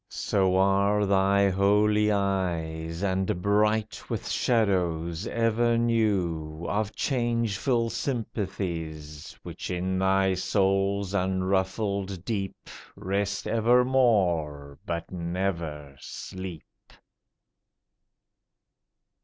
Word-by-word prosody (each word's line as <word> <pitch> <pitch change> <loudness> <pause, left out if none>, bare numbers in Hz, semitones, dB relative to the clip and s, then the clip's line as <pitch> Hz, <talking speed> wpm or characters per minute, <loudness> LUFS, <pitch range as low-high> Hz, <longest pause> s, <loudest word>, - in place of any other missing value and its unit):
So 95 -2 +1
are 100 +2 +3
thy 100 0 +3
holy 105 +2 +3
eyes, 85 -4 -1
And 95 -2 0
bright 105 +3 0
with - - -3
shadows 90 -7 0
ever 115 +1 +1
new 90 -9 0
Of 105 +2 -1
changeful 115 -2 0
sympathies, 85 - -4
Which - - -7
in 95 +1 -1
thy 95 0 +3
soul's 100 +1 0
unruffled 95 0 -1
deep 100 -4 -4 0.3
Rest 100 +1 -2
evermore, 105 - +2
but 85 -1 -4
never 85 -5 -3
sleep. 95 -4 -7
95 Hz, 80 wpm, -27 LUFS, 90-105 Hz, 0.3 s, are